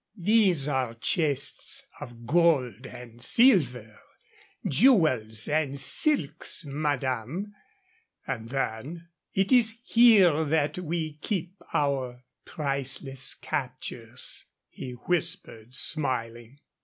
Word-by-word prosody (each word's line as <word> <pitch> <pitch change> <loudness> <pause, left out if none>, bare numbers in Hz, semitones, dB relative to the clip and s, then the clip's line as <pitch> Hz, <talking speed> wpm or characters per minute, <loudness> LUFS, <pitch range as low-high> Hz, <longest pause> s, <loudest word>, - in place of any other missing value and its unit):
"These 190 -6 +3
are 130 -5 -1
chests 140 +3 -1
of 120 -1 -10
gold 135 - +2
and 120 -1 -12
silver, 125 - +2 0.7
jewels 130 - +3
and 145 -2 0
silks, 160 - +1
madame"; 145 - -3 0.7
and 115 0 -5
then, 135 +6 -4 0.3
"It 195 +3 +1
is 230 -3 +4
here 205 -11 +5
that 155 +1 0
we 160 -3 -4
keep 185 -4 -3 0.2
our 130 -4 -1 0.2
priceless 135 -3 -2
captures," - - -5 0.2
he 125 - -8
whispered, 160 - -3
smiling. 125 -4 -1
145 Hz, 90 wpm, -27 LUFS, 125-175 Hz, 0.7 s, here